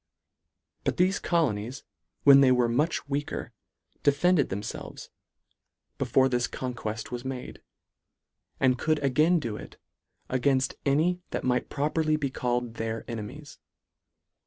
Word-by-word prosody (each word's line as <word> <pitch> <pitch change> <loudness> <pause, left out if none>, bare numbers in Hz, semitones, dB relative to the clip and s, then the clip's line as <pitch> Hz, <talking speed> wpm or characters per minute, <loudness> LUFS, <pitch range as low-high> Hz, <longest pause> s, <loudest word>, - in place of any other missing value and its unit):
But - - -1
thefe 185 +3 +2
colonies 130 -7 0 0.4
when 140 -1 +8
they 130 -2 +6
were 125 -1 +3
much 145 +7 0
weaker, 145 +1 -3 0.5
defended 145 +2 +3
themfelves, 100 +3 -6 0.9
before 135 0 +3
this 125 -2 0
conqueft 110 -4 -5
was 120 0 -4
made; 130 -1 -6 1.0
and 130 -2 +3
could 155 -1 +2
again 155 +6 +3
do 115 -9 -3
it, - - -11 0.5
againft 130 +1 +1
any 165 +6 +2
that - - -3
might 125 -1 0
properly 155 +2 +1
be 140 -3 -2
called 120 -2 -2
their 115 0 -3
enemies. 120 +6 -7
135 Hz, 120 wpm, -27 LUFS, 120-150 Hz, 1.0 s, when